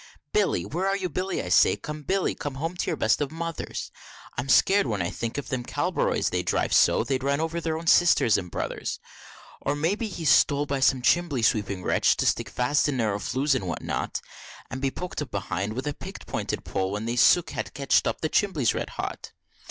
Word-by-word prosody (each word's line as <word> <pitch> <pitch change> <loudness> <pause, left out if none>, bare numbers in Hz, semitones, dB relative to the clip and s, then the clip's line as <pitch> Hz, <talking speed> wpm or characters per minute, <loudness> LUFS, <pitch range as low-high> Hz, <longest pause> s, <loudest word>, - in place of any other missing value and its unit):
Billy 85 - +1
where 180 +5 -2
are 195 0 +1
you, 185 -2 -3
Billy, 185 +4 -2
I 90 - -5
say? 90 - +5
come, 150 +8 -7
Billy, 190 +5 0
come 145 -2 -5
home, 165 +6 -3
to - - -2
your - - 0
best 110 +6 +2
of 145 - 0
Mothers! 165 0 -5 0.4
I'm 125 +3 -4
scared 195 +5 +5
when 105 -4 -1
I 85 -1 -1
think 115 +2 -4
of 145 - -5
them 130 -2 -2
Cabroleys, - - 0
they 90 - 0
drive 90 - 0
so, - - +5
they'd 135 -2 -1
run 140 +2 0
over 165 +1 -2
their 160 -1 -1
own 165 - -7
Sisters 165 -10 +5
and 90 -2 -2
Brothers. - - -4 0.6
Or 145 - -1
may 160 +6 +1
be 220 +2 -3
he's 165 -7 0
stole 145 0 +4
by 140 -1 -2
some 130 -1 +3
chimbly 160 -6 +2
sweeping 100 -4 +1
wretch, - - +2
to - - 0
stick - - +1
fast 135 +4 +1
in 135 - -1
narrow 105 -4 0
flues 135 +7 0
and 125 -8 -2
what 85 - -4
not, - - -3 0.5
And 130 0 -5
be 135 - +1
poked 180 +3 -5
up 145 - -5
behind 100 0 -3
with 130 +4 -4
a 145 - -1
picked - - -9
pointed - - -3
pole, 95 0 -1
when 105 +3 -3
the 120 +1 -2
soot 160 +8 +4
has - - -3
ketch'd, 135 +1 +2
and - - 0
the 155 - +1
chimbly's 155 - +1
red - - -3
hot. - - -5
140 Hz, 225 wpm, -26 LUFS, 115-165 Hz, 0.6 s, say